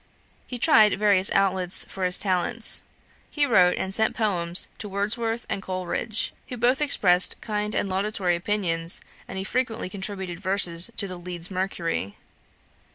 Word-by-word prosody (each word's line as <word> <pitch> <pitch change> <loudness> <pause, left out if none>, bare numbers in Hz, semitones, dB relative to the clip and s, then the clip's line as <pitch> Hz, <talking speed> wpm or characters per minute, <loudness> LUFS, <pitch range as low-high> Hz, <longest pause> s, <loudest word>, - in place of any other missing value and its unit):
He 250 - -5
tried 220 -7 +4
various 200 -2 +3
outlets 190 -2 +2
for 190 -1 -4
his 180 0 +5
talents. 200 +4 +1 0.5
He 295 -1 0
wrote 180 -9 +3
and 190 0 -4
sent 220 +2 +2
poems 180 -5 +1
to 210 - -7
Wordsworth 225 +4 -2
and 195 - -4
Coleridge, 190 +4 -3 0.2
who 250 - -5
both 245 +4 +1
expressed 185 -11 +4
kind 210 -1 -3
and - - -1
laudatory 190 -2 -1
opinions, 170 -3 -1 0.3
and - - -7
he 190 - -3
frequently 225 -2 -3
contributed 190 -3 -6
verses 185 -2 +3
to 200 - 0
the 185 -1 -7
Leeds 175 0 -6
Mercury. 170 - -3
195 Hz, 150 wpm, -24 LUFS, 180-215 Hz, 0.5 s, his